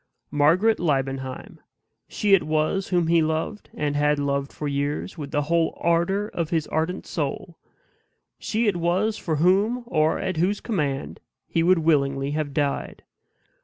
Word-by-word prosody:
Margaret 165 +10 +3
Liebenheim, 135 -4 -2 0.5
she 205 -1 +1
it 195 - +7
was 155 +5 0
whom 175 -2 +1
he 165 0 +3
loved, 160 +7 -2
and 145 -1 -1
had 150 0 +2
loved 140 -1 -1
for 150 - -5
years, 145 +5 -2
with 145 -4 -6
the 145 0 0
whole 165 +2 0
ardor 170 +5 +1
of 170 -6 -3
his 165 -3 0
ardent 160 +4 -2
soul; 165 +3 -4 0.8
she 225 +2 -1
it 205 -4 +1
was 185 +6 +1
for 160 - -2
whom, 200 +10 +2
or 155 -7 +1
at 185 -3 -3
whose 190 +5 +1
command, 145 - -2 0.3
he 165 - 0
would 180 +2 +4
willingly 140 -4 +1
have 150 -1 -2
died. 140 0 -2
160 Hz, 155 wpm, -24 LUFS, 145-185 Hz, 0.8 s, it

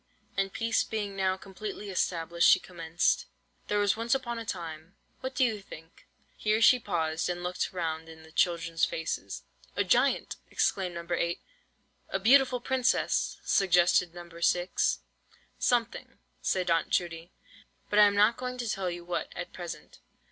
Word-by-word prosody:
And 195 0 0
peace 230 +2 +1
being 205 -3 -4
now 190 -1 +1
completely 200 +1 -7
established, 170 -2 +2
she - - +7
commenced: 175 0 -1 0.4
"There 210 - 0
was 205 -1 +3
once 230 +3 +1
upon 240 -3 -3
a 230 - -6
time—what 175 +9 -7
do - - +3
you 220 -4 0
think?"—here 195 +5 -5
she 250 +2 +6
paused 160 -5 -1
and 175 0 -3
looked 180 +1 -2
round 165 -2 -3
in 160 0 -12
the 160 - -16
children's 165 0 0
faces. 160 0 -2 0.3
"A - - +2
giant!" - - +2
exclaimed 185 -3 0
No. 170 0 -6
8. 170 0 -1 0.7
"A - - 0
beautiful 255 +4 +5
princess!" 260 0 +1
suggested 175 -2 +3
No. 175 0 -9
6. 175 +1 +1 0.6
"Something," 240 -2 0 0.2
said 180 -2 0
Aunt 165 -1 +2
Judy, 170 -1 -1 0.6
"but 210 - +4
I 210 - +9
am 200 - 0
not 210 +3 +4
going 250 0 -4
to 240 -1 -3
tell 195 -4 -1
you 175 0 -6
what 175 - -3
at 175 - -6
present. 175 -2 -8
185 Hz, 155 wpm, -29 LUFS, 170-215 Hz, 0.7 s, I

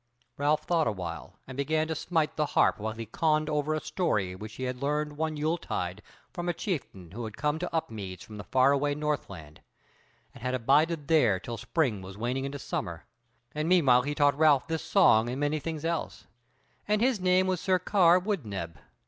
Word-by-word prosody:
Ralph 150 +2 +1
thought 165 -3 +1
awhile 90 -3 -5
and 130 - -9
began 155 +3 0
to 160 - -1
smite 160 -1 -1
the 150 -1 0
harp - - +4
while 110 +1 -3
he 115 +1 -6
conned 155 +6 +1
over 150 +1 0
a - - -1
song 105 - -1
which 105 0 -8
he 130 - -6
had 125 0 -3
learned 150 +1 -1
one 155 0 -2
yule 160 +3 0
tide 90 - -4 0.3
from 175 0 -3
a 175 - -1
chieftain 125 - -5
who 120 +5 -6
had 110 -2 -8
come 150 +1 0
to 180 - -3
Upmeads 105 - -4
from 105 - -11
the 105 - -7
far 130 +1 +3
away 145 +1 +1
Northland, 100 - -4 0.7
and - - -14
had 125 +1 -1
abided 145 +5 +2
there 120 - +4
till 115 +5 -6
spring 120 - 0
was 95 +1 -10
waning 125 +4 -2
into 140 +1 -4
summer, 85 - -5 0.5
and 155 +2 -2
meanwhile 140 -9 +5
he 145 +3 -3
taught 145 -1 +3
Ralph 150 -4 +4
this 160 -1 -2
song 110 +2 +4
and 130 +2 -4
many 145 +1 0
things 160 +1 -5
else, 165 -1 -3 0.6
and 210 0 +2
his 245 -1 +2
name 185 0 +3
was 185 -2 -1
Sir 185 -2 +2
Karr 180 -1 +4
Wood 190 -3 -2
neb. 85 -8 -6
145 Hz, 200 wpm, -28 LUFS, 110-160 Hz, 0.7 s, meanwhile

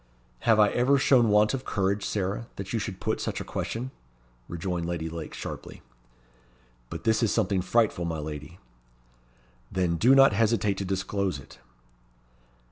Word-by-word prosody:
"Have 110 -1 +6
I 105 -1 +6
ever 130 +3 +3
shown 130 -4 +4
want 105 +2 +4
of 135 -1 -3
courage, 100 -2 0
Sarah, 100 +3 -2
that 95 +2 -6
you 115 - +1
should 100 -3 -5
put - - -2
such - - -3
a - - -4
question?" 125 +3 -4 0.6
rejoined 85 0 -3
Lady 85 -2 -3
Lake, 80 -1 -7
sharply. - - -8 1.1
"But - - -7
this 110 0 +2
is 115 - +2
something 95 -2 +1
frightful, 100 -2 +1
my 80 -1 -2
lady." 75 +2 -7 1.1
"Then 90 -2 0
do 125 +10 +5
not 135 -4 +7
hesitate 105 -2 +1
to 100 - -2
disclose 95 -2 -1
it." 70 -1 -14
100 Hz, 155 wpm, -27 LUFS, 85-115 Hz, 1.1 s, not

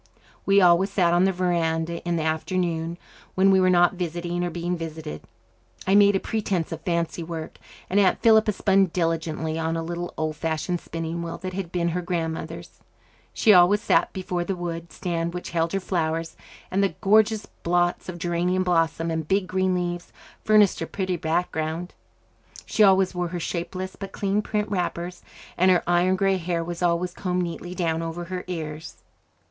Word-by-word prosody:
We 200 0 +5
always 180 +2 +5
sat 180 -3 +2
on 175 +2 +4
the 195 - +3
verandah 170 -2 -1
in 175 - +1
the 160 - -1
afternoon, 165 +1 -1 0.4
when 195 +1 +5
we 190 - +5
were 185 - +4
not 175 0 +4
visiting 175 0 -3
or 175 - -1
being 175 +1 -2
visited. 160 - -6 0.6
I 190 - +2
made 200 0 +6
a - - +2
pretence 195 -7 -2
of 165 -1 -5
fancy 170 -1 -1
work, 160 -1 -6 0.3
and 195 - +2
Aunt 195 -2 +3
Philippa 220 -1 +5
spun 195 -1 +3
diligently 165 -2 -2
on 165 0 -1
a 165 - -2
little 175 +1 -4
old 155 -1 -2
fashioned 165 +3 -2
spinning 165 +1 -4
wheel 170 -1 -5
that 185 +1 -6
had 185 -3 -4
been 170 -1 0
her 180 +2 -2
grandmother's. 165 -1 -4 0.5
She 215 - +4
always 180 +3 +6
sat 210 - +2
before 180 -2 -3
the 190 +2 -2
wood 170 -1 -5
stand 170 -1 -3
which 180 - -6
held 165 -1 0
her 195 - +1
flowers, 165 -3 -2 0.4
and 190 +2 +1
the 195 - 0
gorgeous 215 +1 +3 0.2
blots 175 +1 0
of 180 - -5
geranium 175 +2 0
blossom 165 -2 +1
and 160 -2 -3
big 195 +1 +2
green 185 0 0
leaves 175 -1 -3 0.3
furnished 210 -4 +4
a 165 - -2
pretty 185 -2 -2
background. 160 +1 -2 0.7
She - - -1
always 190 -2 +5
wore 180 -1 -1
her 175 +1 -4
shapeless 185 +3 -4
but 195 -1 -8
clean 200 +1 0
print 210 0 -2
wrappers, 180 -2 -3 0.4
and 185 +1 +5
her 180 -2 +4
iron 175 +2 +3
grey 195 0 +2
hair 170 -1 -2
was 170 +1 -6
always 175 0 +1
combed 180 -2 -1
neatly 175 +1 -6
down 165 -3 0
over 165 +1 -4
her 180 +1 -5
ears. 160 -3 -6
175 Hz, 180 wpm, -25 LUFS, 165-185 Hz, 0.7 s, made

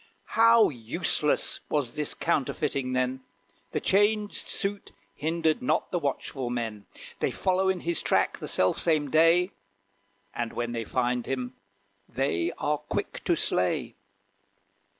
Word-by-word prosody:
How 230 0 +6
useless 145 +4 -1
was 140 -6 -1
this 150 -1 -1
counterfeiting 135 -4 -1
then! 130 +1 0 0.5
The - - -1
changed 205 +1 +2
suit 200 -1 -2 0.2
hindered 160 - 0
not 250 - 0
the 175 - 0
watchful 135 -3 -3
men. 115 -4 -4 0.3
They - - +1
follow 190 0 +1
in 190 -1 0
his 170 -1 -1
track - - +1
the - - -5
self 95 0 +2
same 155 -4 +1
day, 165 +4 +5 0.8
And 120 -1 -3
when 120 0 -2
they 115 -1 -3
find 125 0 -1
him, 130 -1 -3 0.6
they 115 -10 0
are 150 0 0
quick - - -4
to - - +3
slay. 90 -1 0
145 Hz, 130 wpm, -27 LUFS, 125-175 Hz, 0.8 s, How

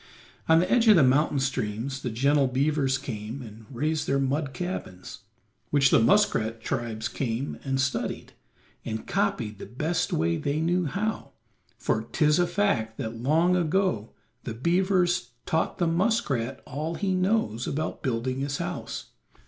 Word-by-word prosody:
On 160 0 +7
the 180 +2 0
edge 240 -2 +4
of 215 - +9
the 165 - +6
mountain 140 +2 +3
streams 130 0 -2
the 125 - -2
gentle 140 +4 +2
beavers 135 0 +1
came 115 0 -6
and 110 -1 -12
raised 150 +5 -1
their 135 - +2
mud 135 +1 0
cabins, 175 - -6 0.5
which 135 -2 +4
the - - +6
muskrat 115 - +3
tribes 110 -1 -3
came 125 +1 -3
and 135 -1 -1
studied 130 0 -2 0.5
and 110 -1 -4
copied 105 -1 -1
the - - -8
best 155 +7 -1
way 85 +1 +1
they 145 - -1
knew 175 +2 +1
how, 205 +8 -3 0.4
for 110 - 0
'tis 150 +7 +2
a 175 - +3
fact 170 - 0
that 115 0 -5
long 165 +7 +3
ago 175 - +1 0.3
the 115 - -5
beavers 175 - +1
taught 160 - 0
the 175 - +1
muskrat 165 - 0
all 155 +4 -4
he 195 0 0
knows 185 - 0
about 155 +3 -3
building 130 0 -1
his 140 0 -2
house. - - -5
140 Hz, 155 wpm, -27 LUFS, 115-170 Hz, 0.5 s, of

